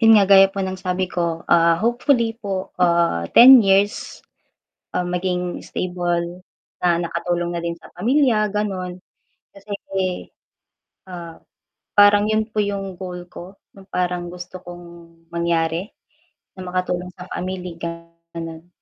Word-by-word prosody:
'yon 225 -1 +7
nga 205 -2 +6
gaya 195 0 +9
po 195 - -2
ng 190 0 -4
sabi 185 0 -2
ko, 170 -2 -2
ah, 170 0 +5
hopefully 235 -1 +1
po, 195 -4 -4
ah, 170 - +2
10 255 +2 +10
years, 195 +1 +1 0.7
um, 180 0 -2
maging 180 -1 -2
stable, 175 0 -3 0.4
na 175 -1 +3
nakatulong 175 0 -2
na 170 - -3
din 170 0 -4
sa - - -15
pamilya, 225 0 +2
ganon, 190 -3 -3 0.5
kasi 200 +1 -14 1.4
ah, 170 -3 -9 0.6
parang 205 0 +6
yun 215 +1 0
po 215 - -5
yung 195 -3 -2
goal 180 -1 -7
ko, 185 +3 -10 0.2
yung 190 - -15
parang 180 -2 -2
gusto 180 +1 -9
kong 175 -1 -11 0.5
mangyari 170 +1 0 0.7
na 185 - -7
makatulong 180 0 -2
sa 180 -1 -11
family 180 -2 -5
ko 170 0 -3 0.5
ganon, 165 0 -7
180 Hz, 135 wpm, -21 LUFS, 175-200 Hz, 1.4 s, 10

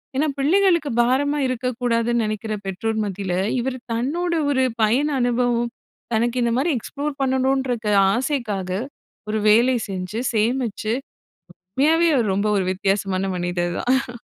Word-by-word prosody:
ஏன்னா 295 +4 +2
பிள்ளைகளுக்கு 340 +2 +3
பாரமா 275 +5 +1
இருக்கக்கூடாதுன்னு 240 -2 0
நெனக்கிற 215 +1 -3
பெற்றோர் 220 +4 -2
மத்தியில, 195 -2 -3 0.3
இவர் 255 +1 -2 0.2
தன்னோட 320 +10 -1 0.2
ஒரு 260 -2 +2 0.2
பயண 245 +7 +3
அனுபவம், 240 -1 +1 0.4
தனக்கு 235 +2 +1
இந்த 235 - +1
மாதிரி 300 +6 +1
எக்ஸ்ப்ளோர் 285 +5 -4
பண்ணணுன்ற 265 -1 +1 0.4
ஆசைக்காக 235 -7 -2 0.6
ஒரு 215 0 0
வேலை 240 +4 +5
செஞ்சு 190 +4 -4
சேமிச்சு 225 -1 0 0.9
உண்மையாவே 325 +4 +4
அவர் 225 -6 +1
ரொம்ப 200 +2 0
ஒரு 195 - +1
வித்தியாசமான 195 0 0
மனிதர் 175 0 -2
தான். 250 -1 0
240 Hz, 120 wpm, -22 LUFS, 215-265 Hz, 0.9 s, வேலை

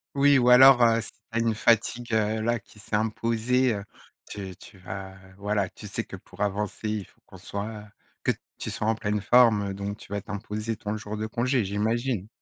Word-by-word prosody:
Oui 140 0 +5
ou 125 -1 +4
alors, 130 -1 +9
heu, 115 0 +4
si 110 - -8
tu - - -33
as 115 - 0
une 115 -1 +1
fatigue, 115 +1 +1
heu, 110 0 +1
là 120 0 +1
qui 105 - -21
s'est 105 0 -4
imposée, 115 +3 +1
heu, 100 -1 -4 0.5
tu 95 -3 -6
tu 100 - -14
vas 95 +1 -8 0.2
voilà. 105 -2 0
Tu - - -11
sais - - -3
que - - -9
pour - - -13
avancer 105 +1 -2
il 105 -3 -2
faut - - -27
qu'on - - -14
soit, 105 +1 -5 0.4
que - - +3 0.3
tu - - -4
sois 105 - -3
en 110 - +3
pleine 105 -1 -2
forme, 110 -4 +5
heu, - - -4
donc 100 +1 -5
tu - - -14
vas 100 - -2
t'imposer 105 +2 -4
ton 105 0 -4
jour 105 0 -6
de 110 - -2
congé, 120 0 0
j'imagine. 110 +1 -1
110 Hz, 215 wpm, -26 LUFS, 105-115 Hz, 0.5 s, alors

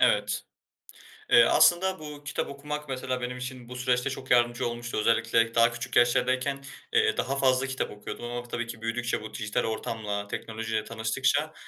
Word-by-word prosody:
evet. - - +2 0.9
Eee, 235 - +8
aslında 190 +1 +4
bu 150 -1 -9
kitap 140 - -2
okumak 150 +1 -6
mesela 130 -1 -2
benim 125 0 -3
için 125 -1 -7
bu 125 - -7
süreçte 125 +1 +1
çok 130 -1 -7
yardımcı 120 -1 +3
olmuştu. 120 0 -4
Özellikle 115 +1 +2
daha 115 0 +5
küçük 115 0 -6
yaşlardayken, 130 +3 +2 0.3
eee, 440 -1 +3
daha 135 - 0
fazla 130 0 +3
kitap 130 -1 -3
okuyordum 105 +3 -7
ama 120 0 -5
tabii 120 0 -3
ki 115 -1 -8
büyüdükçe, 115 +1 -1
bu 110 0 -8
dijital 105 -2 -1
ortamla, 110 -2 -3
teknolojiyle 110 +1 -3
tanıştıkça, 130 +7 0
120 Hz, 165 wpm, -28 LUFS, 115-135 Hz, 0.9 s, Eee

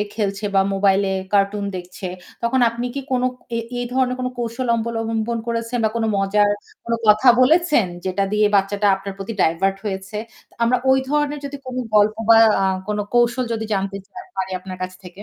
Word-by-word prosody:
খেলছে 200 -1 -2
বা 195 - +5
মোবাইলে 195 0 +2 0.2
কার্টুন 200 +1 +2
দেখছে। 180 +1 -7 0.4
তখন 240 +2 +1
আপনি 235 +2 -4
কি 280 - -2
কোন 250 -1 +1 0.3
এ - - 0 0.2
এই - - -1
ধরনের 255 -1 +1
কোন 255 - -1
কৌশল 240 +2 -3
অবলম্বন 225 0 -2
করেছেন 230 +1 -2
বা 220 - +4
কোন 230 - 0
মজার 205 +1 +2 0.3
কোন 235 - -3
কথা 215 +4 +5
বলেছেন 300 - +4 0.2
যেটা 190 +1 0
দিয়ে 210 0 +3
বাচ্চাটা 200 +1 +1
আপনার 195 +1 -7
প্রতি 195 +3 -5
ডাইভার্ট 190 +4 +1
হয়েছে। 195 0 -4 0.5
আমরা 250 +2 +3
ওই 265 - +5
ধরনের 295 0 0
যদি 280 0 -6
কোন 255 - -6 0.2
গল্প 210 +1 +4
বা 225 - +9 0.2
আ - - +2 0.2
কোন 210 - -1 0.2
কৌশল 240 +1 +3
যদি 220 -1 -2
জানতে 195 0 -2
চাই 370 - -11
পারি 190 0 -2
আপনার 185 0 -8
কাছ 185 0 -8
থেকে। 180 +3 -11
215 Hz, 180 wpm, -21 LUFS, 195-240 Hz, 0.5 s, বা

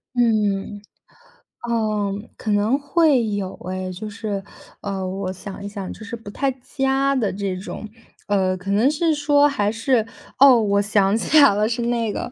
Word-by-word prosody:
嗯， 210 -4 +1 0.9
嗯， 215 -3 -1
可 215 - -3
能 210 +6 +2
会 285 -3 +2
有 200 -2 -3
诶， 185 0 -4
就 200 +4 -7
是， 205 -2 -4 0.4
呃， 195 -2 -3
我 185 0 -4
想 200 +1 -9
一 - - -3
想， 200 -2 -6
就 220 - -10
是 225 - -6
不 225 -2 -10
太 275 +6 -1
佳 270 +1 0
的 225 -8 0
这 195 -1 -3
种， 210 +3 -7 0.4
呃， 190 -2 +1
可 185 +1 -8
能 215 +7 +3
是 320 +1 +1
说 290 0 +4
还 210 -7 0
是， 230 0 +1 0.3
哦， 270 -1 +8
我 200 -1 +2
想 205 0 +2
起 305 +7 +3
来 275 -8 +6
了 210 +1 +2
是 235 +1 -2
那 235 -3 -1
个， 240 - -5
215 Hz, 185 characters per minute, -22 LUFS, 200-250 Hz, 0.9 s, 哦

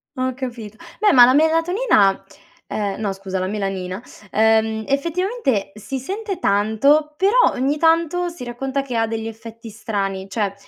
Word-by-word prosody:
Ho 260 -1 -1
capito. 235 -5 -7 0.2
Beh, 420 -1 +5
ma 245 -2 +9
la 255 - +4
melatonina, 320 - +3 0.4
ehm, 200 -2 -3
no 205 -2 -1
scusa 195 -1 -5
la 185 - -2
melanina, 195 -1 -4 0.3
ehm, 220 0 +2
effettivamente 305 - -1
si 260 +5 -5
sente 390 - -5
tanto 275 - +2
però, 425 +6 +4
ogni 275 +4 0
tanto 335 +2 +2
si 335 -7 -9
racconta 265 +3 -3
che 260 -3 -6
ha 225 0 +1
degli 225 0 -4
effetti 225 +1 -10
strani. 195 -3 -4
Cioè, 200 -1 -2
240 Hz, 150 wpm, -20 LUFS, 210-310 Hz, 0.4 s, ma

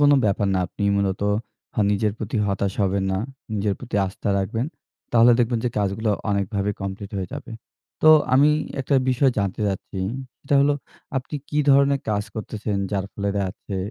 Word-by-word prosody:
কোনো 145 0 +6
ব্যাপার 100 0 +2
না, - - +2
আপনি 95 - -7
মূলত 100 -1 0 0.5
হা - - 0
নিজের 105 +1 +1
প্রতি 110 +2 -3
হতাশ 100 0 0
হবেন 95 0 +1
না, 95 - 0 0.4
নিজের 100 -1 0
প্রতি 120 -4 -4
আস্থা 95 +2 -5
রাখবেন। 110 +6 -1 0.5
তাহলে 120 +1 +7
দেখবেন 120 -1 +2
যে - - +3
কাজগুলো 105 +2 0 0.2
অনেকভাবে 100 0 0
কমপ্লিট 100 +1 -5
হয়ে 95 -2 -3
যাবে। 130 -5 -8 0.5
তো 155 - +7 0.3
আমি 145 +3 +6 0.3
একটা 135 +2 0 0.2
বিষয় 130 +1 +3
জানতে 100 +1 -1
চাচ্ছি। 95 0 -4 0.4
সেটা 140 - 0
হলো 145 +1 +4 0.4
আপনি 135 +3 -4
কি 150 - -1
ধরনে 140 0 +5
কাজ 105 -1 +1
করতেছেন? 105 -1 -3 0.2
যার 95 -1 0
ফলে 100 0 -2
দে 100 - +1
আছে 100 0 -7
105 Hz, 175 wpm, -23 LUFS, 100-125 Hz, 0.5 s, তাহলে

